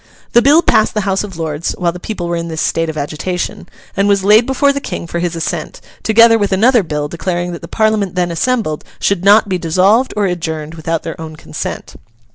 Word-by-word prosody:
The 240 - +5
bill 295 +6 +5
passed 215 - +2
the 210 - +1
House 195 0 0
of 195 -5 -8
Lords 160 0 -3
while 175 -2 0
the 180 - -9
people 180 -2 -5
were 170 - -1
in 170 0 -3
this 160 -1 -5
state 165 +1 0
of 155 - -5
agitation, 170 +5 -4 0.3
and 195 +1 +1
was 200 -1 +2
laid 215 +4 +5
before 280 +1 +2
the 280 - -3
King - - -5
for 170 0 -4
his 175 -1 -2
assent, 165 - -4 0.2
together 225 +1 +5
with 205 -1 0
another 230 +5 +4
bill 150 -4 -3
declaring 175 +2 -3
that 170 - -7
the - - -8
Parliament 215 -4 0
then 175 -1 0
assembled 170 -3 -1 0.2
should 195 -3 0
not 205 +2 +5
be 185 -2 -1
dissolved 190 +10 +2
or 205 - +2
adjourned 160 -4 -3
without 165 0 -3
their 165 0 -6
own 160 -1 -7
consent. 160 - -6
180 Hz, 220 wpm, -15 LUFS, 165-215 Hz, 0.3 s, The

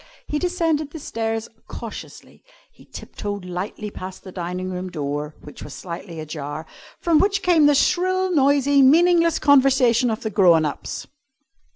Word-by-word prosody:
He 300 - -2
descended 330 -4 0
the 320 - -9
stairs 225 -4 -3 0.2
cautiously. - - -10 0.3
He - - -20
tip - - -11
toed 205 -2 -5
lightly 190 +4 -5
past 185 -1 -9
the 185 - -10
dining 180 +1 -4
room 185 0 -5
door 150 -2 -4
(which 150 - -12
was 145 - -8
slightly 170 -1 -8
ajar), 155 0 -6 0.3
from 335 -3 +3
which 395 -1 +1
came 330 -5 +5
the 290 - +4
shrill, 370 +4 +1
noisy, 280 -1 +4
meaningless, 335 +4 +5
conversation 265 -4 +4
of 220 -1 -3
the 220 - -3
grown 175 -6 +4
ups. 145 - -5
230 Hz, 155 wpm, -22 LUFS, -, 0.3 s, came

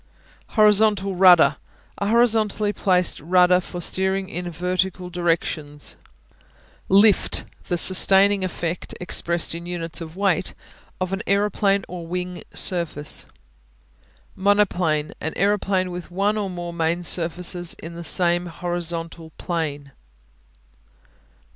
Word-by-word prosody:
Horizontal 210 -2 +4
Rudder 175 -6 +6 0.4
A 200 - -1
horizontally 215 -2 +2
placed 180 -4 +1
rudder 180 +3 +4
for 175 -1 -8
steering 190 +2 -1
in 175 +1 -5
vertical 180 +1 -2
directions. 165 -4 -2 0.9
Lift 200 +1 +4 0.2
The 175 - -1
sustaining 195 +2 +4
effect, 175 -2 -4
expressed 170 -2 -2
in 170 +1 -7
units 170 -2 -4
of 160 0 -8
weight 190 -2 0 0.4
of 185 0 -3
an 195 - -2
aeroplane 200 0 +1
or 175 -2 -8
wing 180 +1 -5
surface. 170 -5 +1 1.1
Monoplane 185 -6 +1
An 160 - -3
aeroplane 195 -2 0
with 175 0 -7
one 200 +4 0
or 205 -2 -2
more 175 -1 -6
main 170 +1 -1
surfaces 175 0 0
in 165 +1 -10
the 170 0 -8
same 175 0 +2
horizontal 170 -1 -5
plane. 145 -5 -4
180 Hz, 110 wpm, -22 LUFS, 170-195 Hz, 1.1 s, Rudder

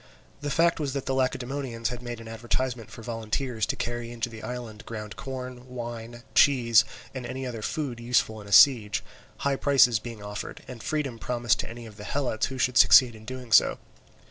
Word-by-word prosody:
The 145 - -3
fact 165 +3 +3
was 140 -3 -2
that 140 -2 -3
the 135 - -1
Lacedaemonians 130 -2 -1
had 125 -1 -6
made 120 -1 -6
advertisement 120 +1 -3
for 115 - -11
volunteers 115 0 -2
to - - -1
carry 120 0 -4
into 120 0 -3
the 110 -1 -10
island 115 -1 -6
ground 105 -2 -6
corn, 125 -1 -7
wine, 120 -1 -7
cheese, 120 -5 +5 0.3
and 130 -2 -5
any 130 +2 -5
other 120 -3 -5
food 135 -1 -3
useful 115 -2 +1
in 100 - -12
a - - -10
siege; 110 -2 +6 0.4
high 140 -1 +2
prices 130 -6 +4
being 110 -2 -8
offered, 105 0 -7
and 125 -3 -9
freedom 140 -5 -2
promised 120 -2 0
to - - -3
any 115 +1 -9
of 105 -2 -12
the 105 - -9
Helots 125 -2 -1
who 130 - -6
should 125 -2 +2
succeed 125 -3 +8
in 110 0 -13
doing 125 -1 -7
so. - - +6
120 Hz, 195 wpm, -27 LUFS, 115-130 Hz, 0.4 s, succeed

